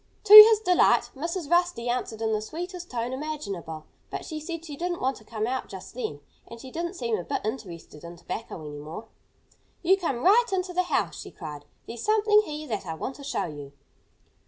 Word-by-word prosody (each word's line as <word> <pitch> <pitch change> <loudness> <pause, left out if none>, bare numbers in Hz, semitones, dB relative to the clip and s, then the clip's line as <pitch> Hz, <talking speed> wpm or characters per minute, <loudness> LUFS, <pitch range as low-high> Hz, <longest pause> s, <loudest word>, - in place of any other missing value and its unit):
To 420 -1 +4
his 430 0 +12
delight, 365 -5 +3
Mrs. 335 +3 -4
Rusty 345 -8 +1
answered 230 -2 -2
in 220 - 0
the 215 - 0
sweetest 350 - -7
tone 240 0 -3
imaginable. 200 - -6 0.2
But - - -6
she 310 -2 -5
said 330 +1 -6
she 300 -3 -7
didn't 350 +3 -3
want 265 +1 -1
to - - -16
come 215 0 -4
out 255 +2 -3
just 190 -1 -10
then. 150 -12 -5 0.3
And 230 - -11
she 260 +2 -10
didn't 340 +4 -4
seem 235 - -2
a - - -5
bit - - -4
interested 175 - -7
in 170 +1 -9
tobacco 180 0 -7
any 145 0 -8
more. 160 +10 -9 0.7
"You 380 +3 +4
come 275 -10 -3
right 440 +6 +5
into 365 -1 -2
the 365 - +2
house!" - - 0
she - - -9
cried. 150 -4 -9 0.2
"There's 230 0 -8
something 425 0 +4
here 305 0 -6
that 205 -4 -4
I 160 - -4
want 260 +11 -5
to 285 - -11
show 285 - -2
you." 145 -4 -9
260 Hz, 205 wpm, -26 LUFS, 210-350 Hz, 0.7 s, his